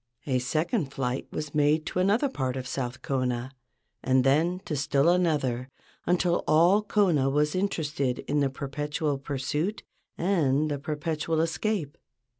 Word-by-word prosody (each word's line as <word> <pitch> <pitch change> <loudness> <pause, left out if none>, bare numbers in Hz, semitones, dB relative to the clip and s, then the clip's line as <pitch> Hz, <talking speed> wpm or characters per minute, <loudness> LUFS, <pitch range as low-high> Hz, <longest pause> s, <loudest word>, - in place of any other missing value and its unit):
A 130 -3 +1
second 155 - -1
flight 130 -1 -2
was 150 -1 -5
made 150 +1 +2
to - - -2
another 205 +9 +3
part 130 - -2
of 130 - -4
South 125 -1 -4
Kona, 130 -1 -1 0.5
and 130 0 +3
then 160 +7 +2
to 155 - -2
still 145 +1 +2
another, 145 -8 +1 0.4
until 175 0 +2
all 175 +7 +5
Kona 185 -10 +2
was 150 +2 +2
inter¬ 185 -3 -1
ested 140 -4 -2
in 150 - 0
the 140 -1 +2
perpetual 145 +2 -3
pursuit 145 +8 -2 0.3
and 155 -5 +1
the 145 - -2
perpetual 155 +2 -2
escape. 165 -1 -1
150 Hz, 145 wpm, -27 LUFS, 135-170 Hz, 0.5 s, all